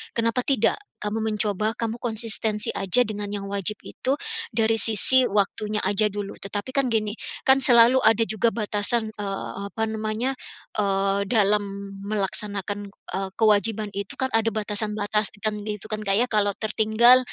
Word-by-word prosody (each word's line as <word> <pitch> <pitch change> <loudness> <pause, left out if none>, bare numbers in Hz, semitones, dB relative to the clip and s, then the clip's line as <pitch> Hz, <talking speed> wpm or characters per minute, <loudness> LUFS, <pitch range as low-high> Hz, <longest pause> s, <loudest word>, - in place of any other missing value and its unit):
kenapa 230 +2 0
tidak 260 -6 +1 0.3
kamu 210 +1 -2
mencoba 215 0 -1
kamu 230 0 -4
konsistensi 220 -2 +1
aja 195 +6 +4
dengan 210 -2 -5
yang 200 0 -5
wajib 200 +1 +1
itu 265 +2 -3 0.4
dari 225 0 +4
sisi 235 +4 +6
waktunya 210 +1 -1
aja 205 +2 +2
dulu 205 -1 -6
tetapi 205 +5 -4
kan 275 0 0
gini, 220 -3 0 0.4
kan 265 0 +6
selalu 245 -1 +7
ada 225 -1 +3
juga 220 +2 0
batasan, 215 +1 0
eee, 200 -2 -5 0.2
apa 220 - -3
namanya, 220 +3 -2 0.5
eee, 195 0 0
dalam 210 -1 +2 0.4
melaksanakan, 205 0 -3
eee, 195 -1 -7
kewajiban 215 0 +1
itu 200 -1 -6
kan 260 -1 -1
ada 225 0 +1
batasan-batasan 210 -1 -1 0.2
gitu 210 0 -5
kan 215 - -2
Kak 195 -1 +1
ya 235 - +3
kalau 205 -1 +1
tertinggal 220 +3 +4
215 Hz, 145 wpm, -23 LUFS, 205-225 Hz, 0.5 s, selalu